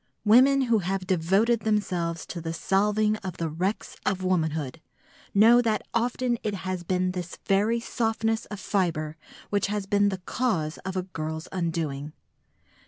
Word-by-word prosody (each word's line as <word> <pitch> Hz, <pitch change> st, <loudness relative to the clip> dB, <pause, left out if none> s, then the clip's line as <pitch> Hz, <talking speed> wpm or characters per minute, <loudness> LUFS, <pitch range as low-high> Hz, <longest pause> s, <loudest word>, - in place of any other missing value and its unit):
Women 260 Hz, +6 st, +6 dB
who 235 Hz, -4 st, +3 dB
have 190 Hz, 0 st, -2 dB
devoted 195 Hz, +6 st, +2 dB
themselves 180 Hz, -7 st, -1 dB
to 170 Hz, -, -6 dB
the 165 Hz, 0 st, -4 dB
salving 210 Hz, +4 st, +2 dB
of 190 Hz, -4 st, -7 dB
the 165 Hz, -1 st, -2 dB
wrecks 185 Hz, +7 st, -2 dB
of 190 Hz, -1 st, -1 dB
womanhood 160 Hz, -5 st, -1 dB, 0.5 s
know 230 Hz, +4 st, +7 dB
that 220 Hz, -3 st, 0 dB
often 240 Hz, 0 st, 0 dB
it 210 Hz, -2 st, -2 dB
has 185 Hz, -1 st, -2 dB
been 185 Hz, +1 st, 0 dB
this 180 Hz, -1 st, -6 dB
very 210 Hz, +4 st, +2 dB
softness 225 Hz, -1 st, -1 dB
of 210 Hz, -, -7 dB
fibre 165 Hz, -6 st, -1 dB, 0.4 s
which 205 Hz, -1 st, +1 dB
has 205 Hz, -1 st, -2 dB
been 205 Hz, +1 st, +3 dB
the 190 Hz, -, -3 dB
cause 175 Hz, -12 st, -1 dB
of 190 Hz, 0 st, -5 dB
a 185 Hz, -, 0 dB
girl's 160 Hz, -2 st, -5 dB
undoing. 160 Hz, -5 st, -2 dB
190 Hz, 155 wpm, -26 LUFS, 170-215 Hz, 0.5 s, know